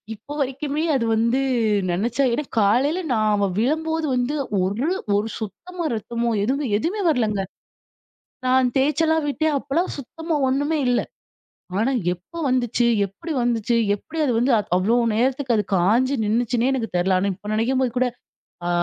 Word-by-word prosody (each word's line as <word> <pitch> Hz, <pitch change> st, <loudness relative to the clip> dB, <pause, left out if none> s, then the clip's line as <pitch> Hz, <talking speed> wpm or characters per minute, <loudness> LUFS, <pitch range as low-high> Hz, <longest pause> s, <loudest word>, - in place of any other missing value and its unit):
இப்போ 260 Hz, +7 st, -10 dB
வரைக்குமே 280 Hz, +3 st, -2 dB
அது 235 Hz, -3 st, +1 dB
வந்து 230 Hz, +4 st, +2 dB, 0.5 s
நினைச்சா 235 Hz, +9 st, 0 dB
ஏன்னா 300 Hz, -, -1 dB, 0.2 s
காலையில 265 Hz, -, +2 dB
நான் 215 Hz, -2 st, +2 dB
அவ 200 Hz, -1 st, +1 dB
விழும்போது 320 Hz, +5 st, 0 dB
வந்து 250 Hz, +4 st, 0 dB, 0.3 s
ஒரு, 205 Hz, -, -1 dB, 0.3 s
ஒரு 205 Hz, +2 st, +1 dB
சுத்தமா 335 Hz, -, -6 dB
ரத்தமோ! 235 Hz, +2 st, -2 dB
எதுவுமே 275 Hz, +6 st, 0 dB
எதுவுமே 395 Hz, -, -2 dB
வரலங்க 215 Hz, -8 st, +1 dB, 1.1 s
நான் 255 Hz, 0 st, +4 dB
தேய்ச்செல்லாம் 310 Hz, +3 st, +2 dB
விட்டேன் 310 Hz, +1 st, 0 dB
அப்பலாம் 290 Hz, +7 st, -1 dB
சுத்தமா 320 Hz, +4 st, -4 dB
ஒன்னுமே 290 Hz, +4 st, 0 dB
இல்ல. 245 Hz, -, +3 dB, 0.8 s
ஆனா, 245 Hz, +5 st, +2 dB, 0.2 s
எப்போ 180 Hz, -, -13 dB
வந்துச்சு? 245 Hz, -1 st, +1 dB, 0.2 s
எப்பிடி 310 Hz, -, -7 dB
வந்துச்சு, 235 Hz, -1 st, +1 dB, 0.2 s
எப்பிடி 320 Hz, +10 st, -8 dB
அது 255 Hz, -, +1 dB
வந்து 250 Hz, +4 st, +2 dB, 0.3 s
அவ்ளோ 210 Hz, +6 st, +2 dB, 0.2 s
நேரத்துக்கு 255 Hz, +1 st, +1 dB
அது 210 Hz, -, +1 dB
காஞ்சு 225 Hz, +9 st, +3 dB
நின்னுச்சுன்னே 235 Hz, +3 st, +1 dB
எனக்கு 235 Hz, -4 st, -2 dB
தெரியல. 185 Hz, +1 st, +2 dB
ஆனா 200 Hz, +1 st, 0 dB
இப்ப 205 Hz, +2 st, -9 dB
நினைக்கும்போது 255 Hz, +2 st, +1 dB
கூட 255 Hz, 0 st, +3 dB, 0.6 s
அ -, -, 0 dB
250 Hz, 145 wpm, -22 LUFS, 220-290 Hz, 1.1 s, நான்